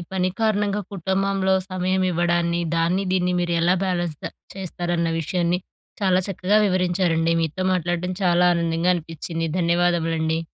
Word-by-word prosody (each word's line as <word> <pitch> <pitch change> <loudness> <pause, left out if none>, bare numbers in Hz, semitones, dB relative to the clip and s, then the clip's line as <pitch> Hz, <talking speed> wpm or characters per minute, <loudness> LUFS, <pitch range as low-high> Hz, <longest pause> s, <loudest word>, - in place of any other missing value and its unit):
పని 185 -1 +1
కారణంగా 210 -2 +1
కుటుంబంలో 190 +1 0 0.2
సమయం 185 +1 0
ఇవ్వడాన్ని. 170 0 +1 0.2
దాన్ని, 175 +4 +1
దీన్ని 180 -1 +1
మీరు 175 -1 -1
ఎలా 175 +2 +3
బ్యాలెన్స్ 175 -4 -1 0.4
చేస్తారన్న 175 -3 -2
విషయాన్ని. 175 +2 0 0.4
చాలా 185 -2 +3
చక్కగా 195 +2 +1
వివరించారండి. 175 -3 +1
మీతో 165 +4 -2
మాట్లాడడం 175 +1 -1
చాలా 175 0 +4
ఆనందంగా 170 +1 +1
అనిపించింది. 165 0 -4
ధన్యవాదములండి. 165 -2 +1
175 Hz, 120 wpm, -23 LUFS, 170-185 Hz, 0.4 s, చాలా